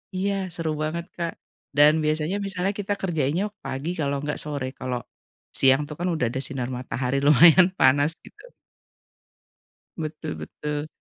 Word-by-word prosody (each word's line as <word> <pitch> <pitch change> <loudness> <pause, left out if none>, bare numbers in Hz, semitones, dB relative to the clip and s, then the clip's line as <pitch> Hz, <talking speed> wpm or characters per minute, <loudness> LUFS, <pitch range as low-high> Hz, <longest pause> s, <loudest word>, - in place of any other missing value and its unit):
iya 195 0 -1
seru 165 -2 -2
banget, 170 +2 -3
Kak, 170 -1 -2 0.4
dan 150 +2 +6
biasanya 155 +5 0
misalnya 195 0 -1
kita 205 0 -2
kerjainnya 165 +1 0 0.2
pagi 140 +6 -3
kalau 140 -2 0
enggak 145 0 -3
sore. 145 -3 -3
Kalau 125 -1 -2 0.6
siang, 135 +2 +5
tuh, 150 - -6
kan 175 - -1
udah 140 -7 0
ada 130 +2 -3
sinar 130 -3 -3
matahari 125 +1 -2
lumayan 165 +5 +8
panas, 145 +4 +5
gitu. - - -16 1.5
Betul 155 0 -5
betul. 150 0 -4
155 Hz, 140 wpm, -25 LUFS, 140-175 Hz, 1.5 s, lumayan